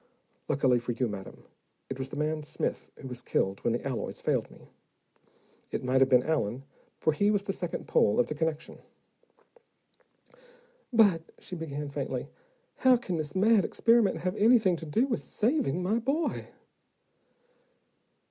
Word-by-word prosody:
Luckily, 130 Hz, -3 st, +2 dB
for 120 Hz, +1 st, -3 dB
you, 125 Hz, +1 st, 0 dB
madam, 100 Hz, -3 st, -8 dB, 0.4 s
it 135 Hz, 0 st, -6 dB
was 130 Hz, 0 st, -4 dB
the -, -, -7 dB
man 155 Hz, +1 st, -1 dB
Smith 150 Hz, -, -3 dB
who 135 Hz, -, -9 dB
was 125 Hz, -1 st, -6 dB
killed 95 Hz, 0 st, -1 dB
when 120 Hz, -, 0 dB
the 120 Hz, -, -2 dB
alloys 135 Hz, -4 st, -3 dB
failed -, -, 0 dB
me. -, -, -18 dB, 1.0 s
It -, -, -3 dB
might 130 Hz, +1 st, +2 dB
have 135 Hz, -, +5 dB
been 125 Hz, -2 st, +5 dB
Allen, 135 Hz, -5 st, -1 dB, 0.3 s
for 155 Hz, -, +1 dB
he 205 Hz, +7 st, +2 dB
was 205 Hz, -2 st, +1 dB
the 200 Hz, -1 st, -2 dB
second 175 Hz, -3 st, -5 dB
pole 105 Hz, -, +3 dB
of 125 Hz, -, +4 dB
the -, -, -4 dB
connection." 155 Hz, 0 st, -3 dB, 2.1 s
"But," 205 Hz, -8 st, +5 dB, 0.2 s
she 180 Hz, -, -8 dB
began 150 Hz, -3 st, -5 dB
faintly, 140 Hz, -, -4 dB, 0.5 s
"how 260 Hz, -1 st, +5 dB
can 185 Hz, -7 st, -3 dB
this 150 Hz, -2 st, -4 dB
mad 210 Hz, +1 st, +4 dB
experiment 230 Hz, -8 st, +2 dB
have 185 Hz, +2 st, -1 dB
anything 215 Hz, -4 st, +5 dB
to 160 Hz, -, -8 dB
do 225 Hz, -, +2 dB
with 255 Hz, -4 st, -2 dB
saving 210 Hz, -, 0 dB
my 215 Hz, +6 st, +1 dB
boy?" 280 Hz, +7 st, -1 dB
160 Hz, 155 wpm, -29 LUFS, 135-205 Hz, 2.1 s, have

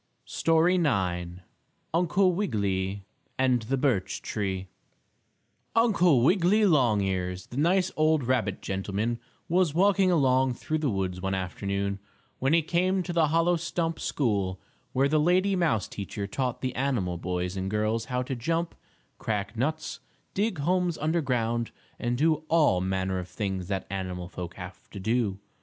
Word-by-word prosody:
STORY 165 Hz, +3 st, +2 dB
IX 90 Hz, -, 0 dB, 0.5 s
UNCLE 180 Hz, +2 st, +3 dB
WIGGILY 100 Hz, -, -1 dB, 0.3 s
AND 130 Hz, -2 st, +2 dB
THE 130 Hz, +5 st, -1 dB
BIRCH 125 Hz, -8 st, 0 dB
TREE 95 Hz, -2 st, -3 dB, 1.1 s
Uncle 180 Hz, -, +4 dB
Wiggily 190 Hz, -, +4 dB
Longears, 95 Hz, -, +1 dB
the 120 Hz, -, -9 dB
nice 180 Hz, +5 st, +2 dB
old 155 Hz, -2 st, +3 dB
rabbit 120 Hz, -6 st, 0 dB
gentleman, 100 Hz, +5 st, -2 dB, 0.3 s
was 175 Hz, -3 st, +2 dB
walking 195 Hz, +1 st, +4 dB
along 130 Hz, -6 st, +3 dB
through 155 Hz, +6 st, -2 dB
the 150 Hz, -3 st, 0 dB
woods 95 Hz, -3 st, -2 dB
one 95 Hz, 0 st, -1 dB
afternoon, 100 Hz, +1 st, -2 dB, 0.4 s
when 135 Hz, +2 st, +1 dB
he 165 Hz, 0 st, +4 dB
came 185 Hz, +3 st, +1 dB
to 175 Hz, -, -4 dB
the 165 Hz, -2 st, +3 dB
hollow 165 Hz, +3 st, +3 dB
stump 165 Hz, -1 st, -2 dB
school, 100 Hz, -8 st, -1 dB, 0.3 s
where 135 Hz, +2 st, +2 dB
the 155 Hz, +2 st, +2 dB
lady 185 Hz, +5 st, +3 dB
mouse 160 Hz, -, +1 dB
teacher 100 Hz, 0 st, -5 dB
taught 125 Hz, +4 st, -2 dB
the 130 Hz, -1 st, -2 dB
animal 115 Hz, -11 st, -1 dB
boys 90 Hz, +1 st, -2 dB
and 95 Hz, 0 st, -2 dB
girls 110 Hz, +2 st, 0 dB
how 125 Hz, +1 st, -1 dB
to 130 Hz, +1 st, -4 dB
jump, 165 Hz, +7 st, -1 dB, 0.5 s
crack 105 Hz, 0 st, -2 dB
nuts, 155 Hz, +7 st, -2 dB, 0.3 s
dig 205 Hz, -1 st, 0 dB
homes 175 Hz, +3 st, +1 dB
under 160 Hz, +3 st, 0 dB
ground, 120 Hz, -3 st, 0 dB, 0.3 s
and 120 Hz, 0 st, -1 dB
do 155 Hz, +2 st, +2 dB
all 150 Hz, -, +3 dB
manner 95 Hz, 0 st, -1 dB
of 90 Hz, -, -6 dB
things 95 Hz, -3 st, -3 dB
that 95 Hz, -2 st, -2 dB
animal 90 Hz, -2 st, -4 dB
folk 90 Hz, -1 st, -7 dB
have 90 Hz, 0 st, -10 dB
to 100 Hz, -, -8 dB
do. 110 Hz, -1 st, 0 dB
125 Hz, 150 wpm, -27 LUFS, -, 1.1 s, Uncle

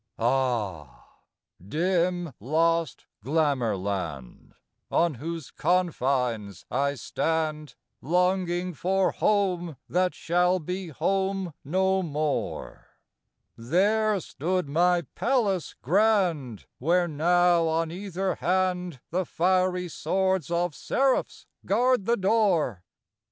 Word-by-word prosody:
Ah! 115 Hz, -, -1 dB, 0.5 s
dim, 175 Hz, -, 0 dB
lost 165 Hz, +4 st, 0 dB, 0.2 s
Glamour 135 Hz, -6 st, +1 dB
land, 90 Hz, -10 st, -5 dB, 0.3 s
On 170 Hz, -1 st, +2 dB
whose 160 Hz, +3 st, -6 dB
confines 130 Hz, -, 0 dB
I 140 Hz, +3 st, 0 dB
stand, 155 Hz, +3 st, -2 dB, 0.3 s
Longing 180 Hz, +1 st, 0 dB
for 190 Hz, +4 st, +1 dB
home 180 Hz, -7 st, 0 dB
that 180 Hz, +1 st, +1 dB
shall 180 Hz, +2 st, +2 dB
be 180 Hz, +2 st, -5 dB
home 190 Hz, +3 st, -1 dB
no 190 Hz, +5 st, +1 dB
more! 150 Hz, -3 st, -3 dB, 0.7 s
There 200 Hz, -, +2 dB
stood 180 Hz, +2 st, -2 dB
my 175 Hz, +4 st, +2 dB
palace 215 Hz, -, 0 dB
grand, 175 Hz, -, +1 dB
Where 175 Hz, +5 st, +2 dB
now, 170 Hz, +2 st, +3 dB
on 160 Hz, 0 st, 0 dB
either 190 Hz, +1 st, -3 dB
hand, 180 Hz, -5 st, -1 dB
The 185 Hz, +3 st, 0 dB
fiery 180 Hz, +1 st, +1 dB
swords 190 Hz, 0 st, 0 dB
of 175 Hz, -1 st, 0 dB
seraphs 265 Hz, -, 0 dB, 0.2 s
guard 245 Hz, +1 st, +2 dB
the 235 Hz, +2 st, +2 dB
door. 190 Hz, -, +1 dB
175 Hz, 95 wpm, -26 LUFS, 145-185 Hz, 0.7 s, now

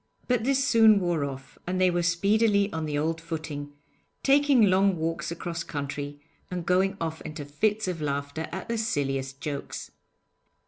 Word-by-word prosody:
But 245 Hz, -3 st, +1 dB
this 270 Hz, +1 st, +2 dB
soon 220 Hz, -3 st, +6 dB
wore 175 Hz, -5 st, 0 dB
off, 135 Hz, -1 st, -7 dB
and 185 Hz, +1 st, -1 dB
they 185 Hz, -1 st, +4 dB
were 175 Hz, 0 st, +1 dB
speedily 200 Hz, +4 st, +2 dB
on 160 Hz, -1 st, -2 dB
the 145 Hz, -1 st, -1 dB
old 165 Hz, +2 st, -1 dB
footing, 155 Hz, -3 st, -5 dB, 0.5 s
taking 280 Hz, -3 st, +5 dB
long 195 Hz, -1 st, +4 dB
walks 165 Hz, 0 st, -2 dB
across 170 Hz, 0 st, -4 dB
country, 145 Hz, -1 st, -5 dB, 0.3 s
and 180 Hz, -2 st, -4 dB
going 190 Hz, +2 st, +2 dB
off 160 Hz, -1 st, -3 dB
into 155 Hz, -2 st, -6 dB
fits 210 Hz, +9 st, 0 dB
of 175 Hz, -3 st, -3 dB
laughter 145 Hz, +2 st, -2 dB
at 190 Hz, -, -5 dB
the 230 Hz, -1 st, -1 dB
silliest 135 Hz, -9 st, -2 dB
jokes. 145 Hz, -2 st, -5 dB
170 Hz, 165 wpm, -27 LUFS, 145-200 Hz, 0.5 s, soon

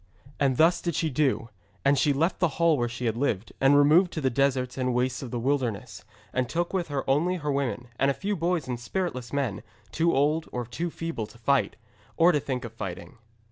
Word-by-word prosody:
And 135 Hz, -3 st, +2 dB
thus 170 Hz, +2 st, +4 dB
did 170 Hz, -3 st, -2 dB
she 160 Hz, -1 st, 0 dB
do, 130 Hz, -4 st, 0 dB, 0.4 s
and 140 Hz, +1 st, +5 dB
she 145 Hz, +2 st, +3 dB
left 160 Hz, +6 st, 0 dB
the 175 Hz, -, +4 dB
hall 170 Hz, -1 st, +4 dB
where 120 Hz, -3 st, -1 dB
she 120 Hz, +1 st, -5 dB
had 115 Hz, -1 st, 0 dB
lived, 115 Hz, -5 st, -1 dB
and 135 Hz, +2 st, +6 dB
removed 160 Hz, +5 st, +5 dB
to 155 Hz, -, -3 dB
the 130 Hz, -2 st, +1 dB
deserts 130 Hz, -1 st, +1 dB
and 125 Hz, -2 st, -1 dB
wastes 125 Hz, 0 st, 0 dB
of 130 Hz, -, -6 dB
the 120 Hz, -, -3 dB
wilderness, 120 Hz, -4 st, -2 dB, 0.3 s
and 130 Hz, -2 st, 0 dB
took 175 Hz, +2 st, -1 dB
with 180 Hz, -3 st, -1 dB
her 140 Hz, -3 st, -3 dB
only 155 Hz, +7 st, +2 dB
her 150 Hz, -4 st, -2 dB
women, 135 Hz, -3 st, -2 dB
and 135 Hz, -, +3 dB
a 140 Hz, -, 0 dB
few 205 Hz, +1 st, -2 dB
boys 170 Hz, -4 st, -1 dB
and 125 Hz, -2 st, -3 dB
spiritless 125 Hz, -3 st, -3 dB
men, 140 Hz, -7 st, -1 dB, 0.3 s
too 165 Hz, +1 st, +2 dB
old 150 Hz, +4 st, +1 dB
or 125 Hz, -1 st, -3 dB
feeble 165 Hz, -1 st, -4 dB
to 120 Hz, -, -17 dB
fight, 135 Hz, +4 st, +1 dB, 0.4 s
or 170 Hz, +2 st, +6 dB
to 150 Hz, -, +2 dB
think 130 Hz, -2 st, -4 dB
of 115 Hz, -, -8 dB
fighting. 90 Hz, -1 st, -7 dB
140 Hz, 220 wpm, -27 LUFS, 125-165 Hz, 0.4 s, and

